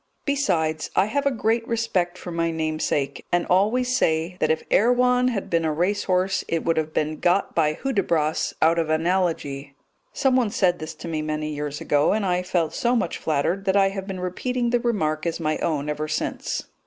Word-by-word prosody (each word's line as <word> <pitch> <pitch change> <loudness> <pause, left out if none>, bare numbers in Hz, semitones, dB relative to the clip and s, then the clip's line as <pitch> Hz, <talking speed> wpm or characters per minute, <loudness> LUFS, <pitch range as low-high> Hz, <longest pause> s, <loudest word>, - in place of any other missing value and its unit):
Besides, 170 - 0
I 190 - +4
have 280 +6 0
a - - +3
great 230 -1 0
respect 190 -7 -1
for 180 - -7
my 165 0 0
namesake, 155 -3 -2
and 175 0 +2
always 245 +7 +2
say 165 -5 +1
that - - +1
if 160 0 +1
Erewhon 250 +2 +4
had 230 -6 -2
been 165 -1 +1
a 160 - +1
racehorse 185 +2 0
it 165 -1 -1
would 165 - +2
have 155 0 -1
been 155 0 -1
got 180 +3 +1
by 155 -2 +2
Hudibras 170 - 0
out 165 +1 +4
of 160 -2 -1
Analogy. 155 -5 -1 0.4
Someone 255 -4 +2
said 185 -5 +1
this 155 0 -6
to 160 - -9
me 160 -2 -2
many 155 0 -3
years 150 0 -4
ago, 145 0 +2
and 210 -1 0
I 180 -1 +1
felt 175 -3 -1
so 240 +1 +1
much 210 -8 -1
flattered 160 +6 -1
that 190 +1 +2
I 195 -1 +4
have 195 0 -6
been 190 -2 -5
repeating 240 +7 -2
the 245 - +3
remark 165 -10 -1
as 165 - -2
my 155 -1 -1
own 150 -3 -1
ever 150 +1 -2
since. 155 - -3
175 Hz, 195 wpm, -24 LUFS, 155-210 Hz, 0.4 s, I